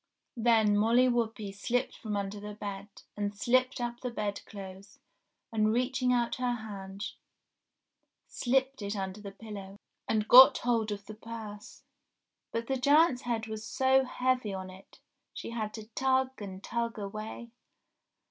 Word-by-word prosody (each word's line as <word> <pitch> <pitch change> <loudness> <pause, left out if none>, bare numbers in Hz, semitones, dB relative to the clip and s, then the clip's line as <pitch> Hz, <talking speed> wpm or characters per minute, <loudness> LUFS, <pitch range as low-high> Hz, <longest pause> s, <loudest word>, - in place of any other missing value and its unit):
Then 225 -3 +4
Molly 230 +5 +4
Whuppie 225 -4 -1
slipped 245 +6 -1
from 210 -3 -4
under 200 +1 -3
the 210 0 -7
bed, 200 -1 -6 0.3
and 205 0 -2
slipped 255 +4 +2
up 240 0 -3
the 250 - -3
bed 210 -3 -3
clothes, 195 -1 -10 0.6
and 215 -1 +3
reaching 250 +2 +1
out 240 -1 +1
her 250 -1 0
hand 200 -3 -6 1.1
slipped 265 0 0
it 200 +1 -3
under 190 +1 -4
the 200 - -6
pillow, 200 -2 -9 0.3
and 215 -1 +1
got 260 +2 +10
hold 230 -3 0
of 200 -1 -5
the 215 - -8
purse. 215 -1 -9 0.7
But 230 0 -2
the 265 +2 -1
giant's 285 0 +4
head 230 -2 -2
was 220 -1 -6
so 265 +2 +3
heavy 250 -5 0
on 185 0 -6
it 190 +1 -16 0.4
she - - -6
had 220 -2 -3
to 220 -2 -8
tug 260 0 +1
and 190 -1 -7
tug 235 -1 -2
away. 215 +3 -6
220 Hz, 150 wpm, -30 LUFS, 205-245 Hz, 1.1 s, got